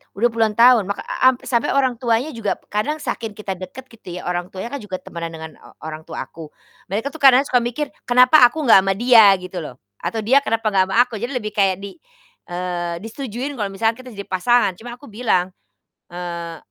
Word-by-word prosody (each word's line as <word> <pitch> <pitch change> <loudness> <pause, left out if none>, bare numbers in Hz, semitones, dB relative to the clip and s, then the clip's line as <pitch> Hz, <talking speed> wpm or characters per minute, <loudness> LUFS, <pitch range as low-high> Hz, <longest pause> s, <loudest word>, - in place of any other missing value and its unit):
Udah 235 +4 +1
puluhan 225 -2 0
tahun, 230 -3 +5
ma 200 - -2
ka - - -8
a 255 - +1
ampe 260 -1 +2
sampai 235 +1 0
orang 260 -4 +1
tuanya 240 +5 0
juga 230 -5 -2 0.2
kadang 215 +9 -1
saking 225 -3 -4
kita 205 -2 -6
dekat 185 +7 -8
gitu 200 -6 -10
ya, 180 - -7
orang 175 0 -3
tuanya 190 +6 -7
kan 280 - -4
juga 205 -5 -6
temenan 170 -2 -7
dengan 160 0 -8
o - - -18
orang 155 0 -8
tua - - -5
aku. 160 -2 -11 0.4
Mereka 220 +9 -3
tuh 320 - -11
kadang 270 -1 +6
ya - - -18
suka 250 - +5
mikir, 245 +5 -3 0.2
kenapa 250 +5 +6
aku 310 +6 -5
gak 230 -7 +7
sama 195 0 0
dia? 225 -3 +6
Gitu 185 -1 -7
loh, 150 -6 -8 0.2
atau 225 -1 -3
dia 260 +6 +5
kenapa 225 -5 -1
gak 190 -1 +2
sama 190 - -3
aku, 225 -4 -8
jadi 245 +5 -4
lebih 215 -4 -3
kayak 195 -2 +1
di 200 +11 -9 0.5
eee, 175 -1 -3
disetujui 245 +3 -5
kalau 205 - -1
misalkan 225 +4 -1
kita 255 -3 -11
jadi 200 - -6
pasangan, 200 +4 +2
cuma 240 +1 -8
aku 250 -2 -15
bilang, 205 -5 0 0.6
eee, 170 -1 -6
215 Hz, 220 wpm, -20 LUFS, 185-245 Hz, 0.6 s, gak